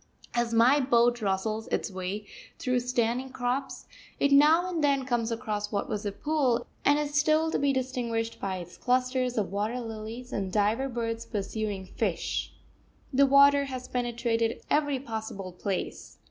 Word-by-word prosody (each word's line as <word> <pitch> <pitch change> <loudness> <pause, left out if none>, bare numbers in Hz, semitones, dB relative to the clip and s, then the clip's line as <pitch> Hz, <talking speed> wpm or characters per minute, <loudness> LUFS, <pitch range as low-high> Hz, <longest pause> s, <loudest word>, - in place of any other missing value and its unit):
As 240 -1 0
my 240 +5 +5
boat 240 -2 +3
rustles 215 +2 -1
its - - -2
way 190 +3 -4 0.3
through 250 -1 0
standing 245 +1 0
crops 260 +1 -3 0.3
it 280 - +3
now 310 +5 +6
and 340 -4 -2
then 275 -2 +2
comes 240 -3 0
across 210 -2 -3
what 200 - -1
was 210 -1 -3
a - - -1
pool 270 -1 0 0.2
and 290 +1 +4
is 295 -1 -2
still 310 +2 +3
to - - 0
be 280 0 +2
distinguished 240 -3 -2
by 190 -1 -2
its 175 -1 -9
clusters 255 0 0
of 200 -4 0
water 210 +5 -1
lilies, 225 +2 -7
and 195 -2 -2
diver 215 +7 +1
birds 230 -2 -3
pursuing 205 -2 -3
fish. - - -2 0.6
The 275 +1 +5
water 280 +1 +6
has 255 -2 -6
penetrated 235 -2 -1
every 290 -2 +2
possible 220 -6 -5
place. 185 +1 -4
240 Hz, 160 wpm, -28 LUFS, 215-270 Hz, 0.6 s, now